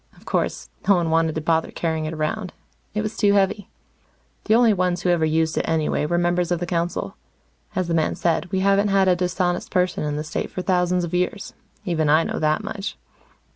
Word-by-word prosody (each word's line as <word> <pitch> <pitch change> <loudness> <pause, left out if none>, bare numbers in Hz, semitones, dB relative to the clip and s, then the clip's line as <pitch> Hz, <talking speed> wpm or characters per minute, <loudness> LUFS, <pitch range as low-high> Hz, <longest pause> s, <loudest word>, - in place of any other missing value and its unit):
Of - - -20
course, - - -2 0.2
no 200 - +6
one 170 -2 0
wanted 165 -1 +2
to 160 - -2
bother 160 +1 +1
carrying 160 -2 -2
it 155 - -4
around. 175 +6 -3 0.4
It 210 - 0
was 215 +1 -4
too 205 -1 +3
heavy. 200 0 +1 0.8
The 220 - +4
only 235 -2 +5
ones 180 -2 0
who 180 - +3
ever 165 -2 +2
used 160 0 +1
it, - - -2
anyway, 155 -2 0
were 175 - 0
members 175 0 +1
of 175 - +1
the 175 - -2
council. 170 0 -2 0.6
As 185 -2 0
the 170 - -1
man 160 -1 +1
said, 170 +1 -1
we 190 - 0
haven't 200 +1 +3
had 195 -1 +3
a 180 - +5
dishonest 180 0 -1
person 180 -3 0
in 150 -1 -2
the 150 - -3
State 155 - -4
for 185 - -5
thousands 180 -1 +1
of 175 - -5
years. 180 +3 -2 0.3
Even 160 -4 0
I 155 +2 +5
know - - -3
that 155 +6 +1
much. 205 -1 -5
175 Hz, 215 wpm, -23 LUFS, 160-190 Hz, 0.8 s, no